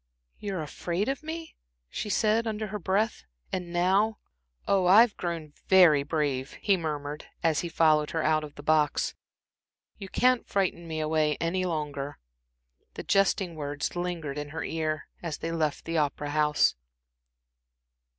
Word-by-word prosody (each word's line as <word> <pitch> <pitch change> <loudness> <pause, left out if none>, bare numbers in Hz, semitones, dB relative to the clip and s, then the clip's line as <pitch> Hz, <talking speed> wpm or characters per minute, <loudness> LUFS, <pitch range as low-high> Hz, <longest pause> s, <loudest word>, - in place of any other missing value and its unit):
"Ah, - - -48
you 200 -1 -4
were 170 -4 -2
afraid 175 +6 -2
of 270 0 -2
me?" 320 +1 -7 0.3
she 210 - -5
said, 220 +2 +2
under 215 0 -2
her 210 +1 -4
breath. 205 +5 0 0.3
"And 180 -2 -3
now" 190 +5 +2 0.5
"Oh, 190 -2 +3
I've 215 +4 +7
grown 165 -4 -4
very 175 -7 +7
brave," 140 -3 -1
he 200 - +2
murmured, 150 -3 -4 0.2
as 160 -2 +3
he 175 - -3
followed 155 -2 +3
her 160 -1 -1
out 155 0 +2
of 150 -1 -9
the 145 - -10
box, 155 -1 +2 0.9
"you 195 -2 -7
can't 250 +3 +2
frighten 185 -3 0
me 160 -1 -3
away 155 -1 +1
any 185 +2 0
longer." 145 -4 -3 0.8
The - - -6
jesting 195 -2 +2
words 145 0 -4
lingered 170 -5 -3
in 145 0 -5
her 160 +2 -4
ear 155 -1 -2
as 165 -3 -4
they 165 - -4
left 155 -3 -1
the 165 -1 0
Opera 145 0 -1
House. 150 0 +3
165 Hz, 160 wpm, -28 LUFS, 150-190 Hz, 0.9 s, I've